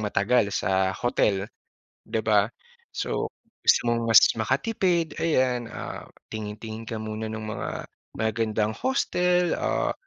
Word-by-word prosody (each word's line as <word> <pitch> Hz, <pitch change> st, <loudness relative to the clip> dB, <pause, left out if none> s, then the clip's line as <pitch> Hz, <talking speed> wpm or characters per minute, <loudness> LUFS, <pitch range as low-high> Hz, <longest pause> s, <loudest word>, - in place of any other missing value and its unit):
matagal 105 Hz, +2 st, +2 dB
sa 95 Hz, -1 st, +1 dB
hotel, 100 Hz, -5 st, +1 dB, 0.6 s
di 110 Hz, -, -2 dB
ba? 105 Hz, -2 st, +4 dB, 0.5 s
So, -, -, -2 dB, 0.3 s
gusto -, -, +6 dB
mong 115 Hz, 0 st, +1 dB
mas 115 Hz, -, +11 dB, 0.2 s
makatipid, 170 Hz, -, 0 dB
ayan, 130 Hz, -7 st, +1 dB
ah, -, -, -7 dB, 0.3 s
tingin-tingin 110 Hz, +1 st, -6 dB
ka 115 Hz, -, -3 dB
muna 110 Hz, 0 st, -4 dB
ng 110 Hz, 0 st, -5 dB
mga 110 Hz, -, -4 dB, 0.5 s
magagandang 110 Hz, 0 st, 0 dB
hostel, 180 Hz, -9 st, +1 dB
ah, -, -, 0 dB
110 Hz, 120 wpm, -26 LUFS, 110-130 Hz, 0.6 s, mas